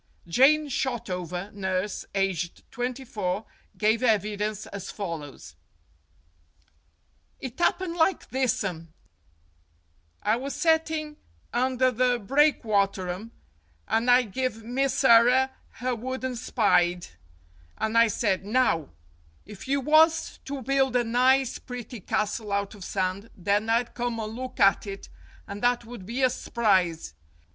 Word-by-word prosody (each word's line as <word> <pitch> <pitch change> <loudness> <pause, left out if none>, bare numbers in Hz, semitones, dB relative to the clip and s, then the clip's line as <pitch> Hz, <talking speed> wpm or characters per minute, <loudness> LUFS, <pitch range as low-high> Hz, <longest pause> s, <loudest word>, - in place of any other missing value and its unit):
Jane 275 - +5
Shotover, 190 - -3
nurse, 190 0 -2
aged 185 -3 -1
twenty 250 +2 -4
four, 205 -3 -3 0.3
gave 220 +2 +2
evi 215 -3 +2
dence 210 0 -3
as 200 -2 -7
follows: 165 -8 -7 1.8
"It 260 +5 -7
'appened 350 -1 +1
like 350 +3 +1
thissum. 195 -11 -1 1.3
I 215 +2 +2
was 275 +3 -5
setting 320 -2 0 0.4
under 255 +1 +2
the 250 0 +1
breakwaterum, 205 -6 +1 0.6
and 230 +2 +1
I 250 +1 +6
give 225 0 -3
Misserrer 260 0 +4 0.2
her 255 0 -2
wooden 260 +2 -4
spide, 180 -7 +2 0.7
and 220 +1 -2
I 230 0 +6
said, 205 -3 0
'Now, 205 - +1 0.6
if 210 +3 -11
you 280 +1 +1
was 315 +3 +3
to 275 -1 -5
build 270 0 +1
a 245 - +3
nice, 255 +2 +2
pretty 245 -1 -8
castle 210 +2 -2
out 200 +1 -1
of 205 -3 -11
sand, 190 +4 -2
then 205 +4 0
I'd 235 +1 +1
come 240 -1 -3
and 215 0 -4
look 255 +1 -7
at 195 +1 +4
it, 195 0 -7 0.4
and 200 +1 -7
that 245 -1 +1
would 230 -5 -10
be 250 +4 -2
a 255 - +5
s'prise.' 185 - 0
230 Hz, 125 wpm, -26 LUFS, 200-255 Hz, 1.8 s, I